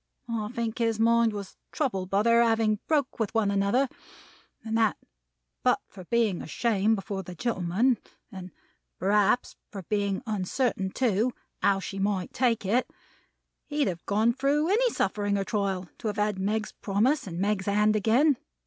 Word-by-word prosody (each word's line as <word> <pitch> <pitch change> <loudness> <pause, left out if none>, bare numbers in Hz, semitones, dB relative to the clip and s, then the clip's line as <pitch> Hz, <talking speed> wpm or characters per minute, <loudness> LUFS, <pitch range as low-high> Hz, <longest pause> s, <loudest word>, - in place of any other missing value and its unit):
I 225 -3 -2
think 235 -1 -3
his 225 -2 +1
mind 230 0 +4
was 200 -2 -7
troubled 195 -11 -2
by 200 +2 +2
their 235 +1 +5
having 225 -2 +2
broke 290 -5 0
with 225 0 -2
one 210 -3 +2
another; 200 +7 +2 0.8
and 225 0 -2
that 225 -2 +2 0.6
but - - +3
for 185 -3 -11
being 225 -4 +1
ashamed 215 +4 +1
before 195 -1 -4
the 180 -1 -9
gentlemen, 220 +3 +1 0.3
and 185 -2 -8 0.5
perhaps 205 +5 +2 0.2
for 195 -3 -7
being 200 +2 -1
uncertain 210 0 -1
too, 230 +2 +1 0.3
how 195 -1 +3
she 195 +1 -5
might 195 -2 -1
take 235 -5 +1
it, 235 +7 +1 0.8
he'd 295 -2 0
have 170 -2 -4
gone 220 +4 +2
through 285 +5 +1
any 480 +5 +3
suffering 205 - 0
or 195 - 0
trial 195 -3 -2
to - - -4
have 210 0 -2
had 210 -2 0
Meg's 215 +3 -1
promise, 220 +7 0
and 170 -2 -6
Meg's 200 0 0
hand 210 +1 +3
again. 245 +7 +3
215 Hz, 160 wpm, -27 LUFS, 195-235 Hz, 0.8 s, their